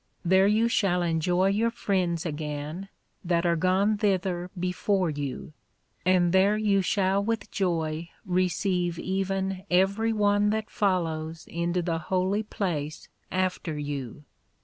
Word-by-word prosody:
There 190 +2 +5
you 220 +3 +3
shall 185 -6 +1
enjoy 175 +3 +2
your 215 +4 +2
friends 185 -7 -1
again, 150 +4 -4 0.3
that 170 -1 +1
are 170 -1 +3
gone 190 +5 +2
thither 185 -3 0
before 180 0 0
you; 145 0 -5 0.5
and 180 -1 +3
there 195 +3 +4
you 205 -2 +2
shall 195 +1 +1
with 225 +1 -2
joy 165 -3 -1 0.2
receive 180 -1 0
even 190 0 -2
every 195 +5 +2
one 205 -1 +2
that 215 0 -2
follows 165 -5 -1
into 170 +1 -1
the 165 -1 -1
holy 185 +5 0
place 170 -8 -4 0.2
after 185 -4 -1
you. 145 -2 -5
185 Hz, 125 wpm, -27 LUFS, 170-195 Hz, 0.5 s, There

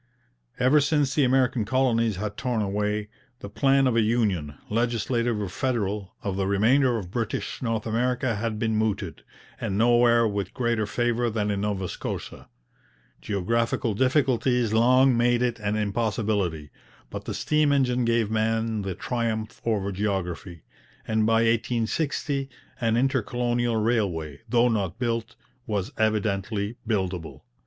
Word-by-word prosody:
Ever 130 +4 +5
since 145 -2 +1
the 145 - +3
American 130 -2 +2
colonies 115 -2 +1
had 100 +2 -4
torn 120 -4 -1
away, 105 +1 -1 0.3
the 100 - -7
plan 135 +3 +3
of 125 -3 +2
a 115 - +4
union, 105 -10 0
legislative 115 0 0
or 100 - -2
federal, 105 -2 -2
of 95 -1 -2
the 95 -1 0
remainder 120 +6 +3
of 90 -5 -6
British 115 0 -3
North 115 -3 -1
America 120 +1 0
had 110 0 -2
been 110 0 0
mooted, 110 -1 -1 0.4
and 95 - -2
nowhere 120 0 +4
with 100 -3 -3
greater 120 -4 0
favour 120 +2 0
than 105 -2 -1
in 100 -1 -2
Nova 100 -3 -1
Scotia. - - -6 0.7
Geographical 115 +3 0
difficulties 130 -2 +2
long 130 +3 +5
made 120 +1 +2
it 120 -2 -1
an 105 0 -1
impossibility, 105 - -1 0.4
but - - -6
the - - -4
steam 150 -1 +2
engine 125 -3 +2
gave 115 -2 +1
man 110 0 0
the 95 -2 -4
triumph 115 -2 -3
over 100 -4 0
geography, 95 -4 -3 0.4
and 110 0 +1
by 115 0 +3
1860 125 +5 0 0.3
an 115 -1 +1
intercolonial 120 -2 0
railway, 100 -10 0
though 120 0 +4
not 100 -7 -1
built, 115 -2 -2 0.3
was 105 -3 -2
evidently 105 0 0
buildable. 95 -6 -2
115 Hz, 140 wpm, -25 LUFS, 105-120 Hz, 0.7 s, Ever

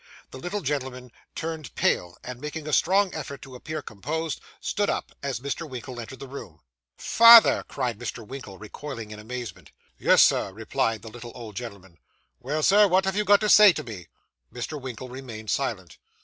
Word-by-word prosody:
The 130 - -9
little 185 +8 -4
gentleman 130 -4 -4 0.2
turned 160 -4 -5
pale; 90 0 0
and, 125 0 -8
making 150 +1 -6
a 155 - -3
strong 190 +4 +3
effort 140 -3 -6
to 135 - -11
appear 155 +4 -6
composed, 155 +9 -4 0.2
stood 205 0 -1
up, - - -2
as 140 -3 -3
Mr. 145 +4 -4
Winkle 125 -1 -7
entered 120 +2 -8
the 135 - -7
room. 100 - -10 0.4
'Father!' 230 -1 +8
cried 125 -5 -3
Mr. 120 -1 -6
Winkle, 115 -5 -9
recoiling 115 +1 -8
in 105 - -8
amazement. 120 +2 -7 0.3
'Yes, - - +6
sir,' - - +2
replied 110 +1 -1
the 115 - -8
little 120 0 -10
old 115 -5 -9
gentleman. 100 -7 -9 0.4
'Well, 145 +5 -2
Sir, 205 +4 +6
what 190 0 +3
have 190 -1 -1
you 210 - +1
got 205 0 +5
to 210 - +1
say 210 -3 +9
to 155 - -5
me?' 100 -9 -9 0.4
Mr. 140 +4 -5
Winkle 130 -1 -7
remained 120 -4 -7
silent. 105 -10 -3
130 Hz, 180 wpm, -26 LUFS, 115-155 Hz, 0.4 s, say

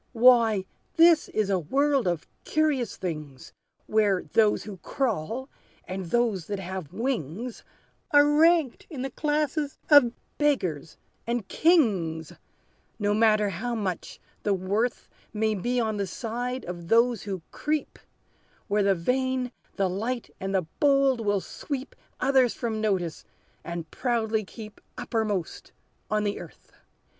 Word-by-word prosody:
"Why, 230 -5 +5 0.3
this 330 -1 +6
is 210 -2 0
a 190 - +2
world 275 - +1
of 175 -3 -1 0.2
curious 300 -7 0
things, 150 -7 -6 0.3
Where 210 -3 +2
those 215 -2 +4
who 205 -3 -8
crawl, 235 - -2 0.4
and 185 0 -4
those 215 -3 0
that 205 - -2
have 185 -4 -6
wings, 225 - -3 0.5
Are 290 -2 +6
ranked 310 -2 +3
in 275 -7 -5
the 270 - -3
classes 295 0 -1
of 285 -5 +8 0.3
beggars, 185 - 0 0.3
and 235 -4 -1
kings, 190 - +2 0.6
No 205 -1 +1
matter 215 -1 +4
how 235 +7 -3
much 190 -6 -4 0.2
the 205 -1 +1
worth 205 +6 -1 0.3
May 220 0 +1
be 240 +5 -1
on 220 -2 0
the 200 -1 -1
side 245 +5 -4
of 175 -1 -7
those 230 +1 +3
who 190 -5 -5
creep, 300 -1 -2 0.7
Where 210 -1 +2
the 195 -1 +3
vain, 255 +6 0 0.2
the 195 -1 +1
light, 225 +7 -3
and 195 +1 -2
the 185 -3 +1
bold 275 -4 +3
will 205 -2 +1
sweep, 275 +5 -6 0.2
Others 260 -2 +3
from 225 -3 -2
notice, 185 -6 -1 0.4
and 170 -2 -6
proudly 225 -3 0
keep 210 +2 -11 0.2
Uppermost 215 -7 -3 0.4
on 215 -1 +1
the 205 -1 -1
earth! - - -13
220 Hz, 135 wpm, -27 LUFS, 190-260 Hz, 0.7 s, of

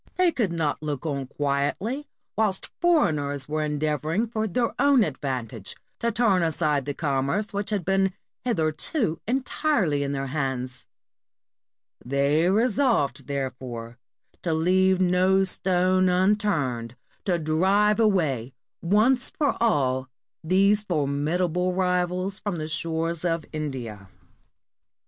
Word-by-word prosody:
They 365 -2 +4
could 220 - -1
not 160 -4 -1
look 150 -1 -4
on 140 -4 -2
quietly 145 - -2 0.3
whilst 210 -3 0
foreigners 150 - +1
were 155 +1 -1
endeavoring 150 - -1
for 220 -1 -2
their 235 +4 0
own 280 -4 +5
advantage 130 - -4 0.2
to 235 0 0
turn 210 -5 +3
aside 155 -4 +1
the 145 -1 -3
commerce 145 +8 -1
which 200 0 -1
had 205 -6 -1
been 195 0 +2 0.3
hitherto 165 - -1
entirely 250 - 0
in 140 0 -1
their 135 -1 -2
hands; 130 -2 -3 1.2
they 140 +6 +2
resolved, 225 - +1
therefore, 125 -4 -5 0.4
to 165 -3 0
leave 185 +3 +3
no 185 +1 +3
stone 185 0 +2
un 185 +3 +3
turned 130 - -2 0.3
to 180 -3 +1
drive 190 +7 +2
away 150 - +1 0.3
once 220 +8 +3
for 290 -3 0
all 130 - +1 0.3
these 195 +5 +3
formidable 175 +2 0
rivals 180 +1 0
from 205 -3 -3
the 155 -2 -4
shores 165 +1 -2
of 165 -3 -1
India. 120 -10 -5
170 Hz, 120 wpm, -25 LUFS, 140-200 Hz, 1.2 s, own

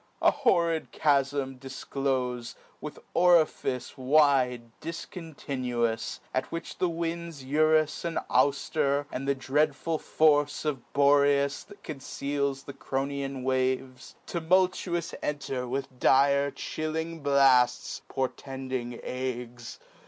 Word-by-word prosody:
} - - -38
An - - +7
horrid 170 - +1
chafm 140 -2 +1
difclofe, 130 -2 -3 0.3
with - - -7 0.2
orifice, 160 -7 +2
Wide, 130 -4 +3
difcontinuous; 130 - -3
at 130 0 -2
which 165 - -6
the 180 - +2
winds 170 -3 -4
Eurus 155 +2 +2
and 170 -1 -2
Aufter, 140 +2 +1
and 135 +2 -4
the 140 - +2
dreadful 145 +3 0
force 145 -1 +2
Of 140 -5 -3
Boreas, 140 0 +3
that 205 0 -16
congeals 140 -1 -3
the 140 - -8
Cronian 135 0 -3
waves, 130 0 -1
Tumultuous 175 0 +1
enter 135 -4 -3
with 130 0 -4
dire 140 +2 +4
chilling 160 +3 -4
blafts, 135 -4 +3
Portending 130 -1 -4
agues. 125 -2 -5
140 Hz, 105 wpm, -28 LUFS, 130-155 Hz, 0.3 s, An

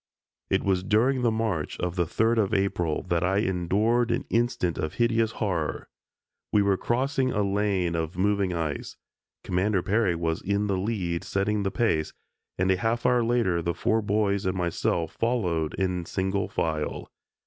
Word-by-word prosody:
It - - +1
was 95 -2 +1
during 120 +7 +2
the 120 - +3
march 110 -8 -2
of 90 -1 -2
the 90 -2 +1
3d 115 +7 +1
of 105 0 +1
April 90 -5 0
that 85 -2 0
I 95 +2 +1
endured 105 +5 +1
an - - -1
instant 115 -7 0
of 80 - -3
hideous 115 -1 +2
horror. 85 -8 -2 0.6
We 105 - +4
were 100 -1 +3
crossing 130 +5 0
a 105 -3 +1
lane 100 -3 0
of 80 +1 -3
moving 100 0 +1
ice. 80 -4 -3 0.5
Commander 95 +1 0
Peary 105 -3 +2
was 80 -1 -1
in 100 +2 0
the 100 -2 0
lead 95 -5 -2
setting 105 +2 0
the 100 - 0
pace, 85 -7 0 0.4
and 95 +1 +2
a 95 - +2
half 115 +2 -1
hour 125 -1 +4
later 115 -8 +1
the 85 +1 -2
four 110 0 +1
boys 100 -2 0
and 95 0 -1
myself 85 -2 -1
followed 90 -10 -1
in 90 -2 -1
single 95 +1 -1
file. 80 -2 -2
100 Hz, 170 wpm, -26 LUFS, 85-110 Hz, 0.6 s, We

